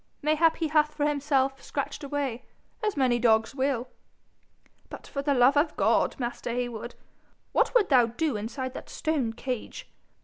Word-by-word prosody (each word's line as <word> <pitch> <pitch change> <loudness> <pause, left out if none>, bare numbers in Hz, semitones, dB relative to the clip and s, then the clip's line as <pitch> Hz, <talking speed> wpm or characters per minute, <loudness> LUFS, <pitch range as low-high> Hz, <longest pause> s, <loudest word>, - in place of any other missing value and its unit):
Mayhap 310 +2 +3
he 320 -2 -1
hath 300 0 +2
for 295 - 0
himself 275 -2 +1
scratched - - -4
a 280 - -6
way, 275 -5 -2 0.4
as 420 -6 -1
many 250 -3 +2
dogs 225 0 +3
will.' 265 -2 -1 1.0
'But, - - -9
for 280 - -4
the 280 0 +1
love 250 +3 +5
of 300 +2 +1
God, - - +2
master 240 -1 -4
Heywood, 240 -1 -4 0.6
what - - +1
would 435 -6 +4
thou 250 -5 +5
do 275 +3 -1
inside 245 +5 -4
that - - -9
stone 295 -8 -1
cage? 245 +1 -5
270 Hz, 165 wpm, -27 LUFS, 240-300 Hz, 1.0 s, love